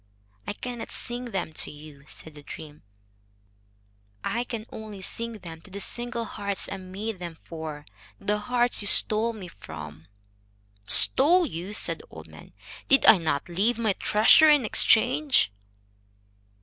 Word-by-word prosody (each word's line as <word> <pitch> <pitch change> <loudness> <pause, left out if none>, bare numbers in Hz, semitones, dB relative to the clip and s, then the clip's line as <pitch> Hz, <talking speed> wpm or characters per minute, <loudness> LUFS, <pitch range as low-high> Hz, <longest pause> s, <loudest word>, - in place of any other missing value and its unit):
"I - - -2
cannot 240 +2 -7
sing 245 +1 -3
them 190 -8 -4
to - - -2
you," 145 -2 -13
said 160 - -7
the 145 - -12
dream. 150 +1 -10 1.4
"I 235 +1 -1
can 225 -3 -6
only 210 -3 -9
sing 230 +4 -3
them 170 -6 -10
to 200 - -15
the 200 +1 -7
simple 240 +2 -2
hearts 200 -3 -2
I 195 - -4
made 190 +3 -6
them 170 -2 -7
for, 155 -3 -8 0.3
the 210 0 -1
hearts 245 +1 0
you 205 - +2
stole 220 +3 +4
me 210 -5 -9
from." 80 - -11 0.8
"Stole 345 +7 +5
you!" 180 - -6
said 210 - 0
the - - -15
old - - -11
man. - - -15 0.3
"Did 275 - +4
I 210 - +8
not 145 -4 -1
leave 200 +7 0
my 220 -3 +1
treasure 215 +11 +5
in 295 -5 +4
exchange?" 250 - +3
205 Hz, 150 wpm, -26 LUFS, 165-235 Hz, 1.4 s, I